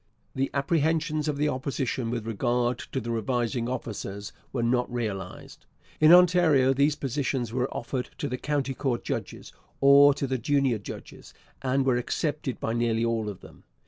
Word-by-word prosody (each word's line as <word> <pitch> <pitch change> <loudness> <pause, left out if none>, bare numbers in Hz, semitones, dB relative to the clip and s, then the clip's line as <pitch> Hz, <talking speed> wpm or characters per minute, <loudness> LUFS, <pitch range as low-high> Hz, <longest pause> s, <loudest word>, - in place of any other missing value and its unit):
The 135 +1 -1
apprehensions 155 +1 +1
of 150 -2 -1
the 150 +1 +1
Opposition 130 -3 -2
with 115 -2 -3
regard 120 +2 0
to 135 - -1
the 120 -1 -4
revising 120 +1 -1
officers 100 -5 -5 0.2
were 120 -3 -2
not 125 +1 +1
realized. 105 -6 -5 0.3
In 155 +1 +7
Ontario 170 -7 +6
these 140 +2 +2
positions 130 -3 -2
were 125 +1 -1
offered 125 +1 -4
to - - -3
the 125 +1 -4
county 140 -2 -1
court 130 -3 -2
judges, - - -5 0.3
or 140 +1 +7
to 140 - -2
the 130 -1 -2
junior 135 -2 +1
judges, 100 - -10 0.3
and 130 +1 +1
were 130 -2 +3
accepted 145 +2 -2
by 115 - -2
nearly 115 -1 +1
all 115 -2 -1
of 100 - -8
them. - - -15
130 Hz, 165 wpm, -27 LUFS, 120-140 Hz, 0.3 s, In